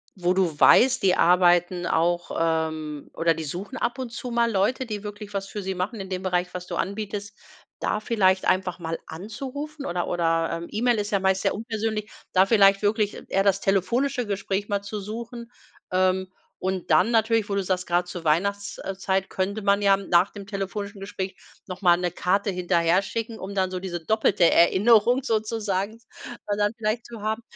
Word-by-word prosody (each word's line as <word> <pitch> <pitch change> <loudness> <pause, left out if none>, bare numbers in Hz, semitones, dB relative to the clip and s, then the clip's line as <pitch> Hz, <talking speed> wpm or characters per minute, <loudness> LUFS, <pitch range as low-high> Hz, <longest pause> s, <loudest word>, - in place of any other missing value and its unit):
wo 180 -1 +1
du 175 -6 0
weißt, 260 +2 +6
die 185 -1 +4
arbeiten 175 0 +3
auch 175 +1 0
ähm, 160 -2 -2
oder 165 0 +2
die 160 0 -5
suchen 195 - -6
ab 240 +3 -2
und 245 -3 -5
zu 245 +1 -6
mal 235 -1 +2
Leute, 220 +7 +1
die 210 -2 -5
wirklich 205 0 -8
was 195 0 -3
für 205 - -6
sie 190 0 -3
machen 195 +5 -3
in 190 - -8
dem 185 0 -4
Bereich, 180 -1 -1
was 180 0 -6
du 175 - -4
anbietest, 200 +1 -4 0.4
da 210 - -1
vielleicht 190 -4 +2
einfach 185 -1 0
mal 165 -1 -4
anzurufen 275 - -7
oder 175 0 -2
oder, 165 -1 +1
ähm, 165 +1 -4
E-Mail 235 +2 +1
ist 205 +1 -3
ja 200 - +2
meist 190 0 +1
sehr - - +2
unpersönlich. 220 -1 -3 0.2
Da 190 +1 +5
vielleicht 195 -2 +5
wirklich 210 0 +1
eher 195 +1 +2
das 195 -1 +2
telefonische 245 +7 +1
Gespräch 200 0 -2
mal 200 -1 -1
zu 205 +1 -5
suchen. 235 +3 -7 0.4
Ähm, 185 0 +2 0.3
und 185 -2 -2
dann 155 +9 +5
natürlich, 225 -1 +2
wo 200 - -1
du 200 - 0
sagst, 180 -1 -2
grad 175 +1 +1
zur 175 -2 -7
Weihnachts 200 +6 0
äh, 195 -1 -5
Zeit 195 0 -1
könnte 200 +3 -2
man 200 +1 +2
ja, 200 -1 +5
hm, 195 0 -9
nach 175 +2 +4
dem 200 -2 -9
telefonischen 200 0 -5
Gespräch 190 -1 -5 0.3
noch 185 +1 -7
mal 175 -2 +6
'ne 180 -1 -1
Karte 195 +3 0
hinterherschicken, 185 +5 0
um 200 +1 -7
dann 185 -1 +1
so 185 - -3
diese 175 -3 -5
doppelte 215 -4 +2
Erinnerung 230 +8 +4
sozusagen 215 -2 -2 0.5
also 205 0 -1
dann 205 +2 +1
vielleicht 220 +1 -2
zu 230 -3 -10
haben. 220 +2 -2
195 Hz, 190 wpm, -25 LUFS, 180-215 Hz, 0.5 s, weißt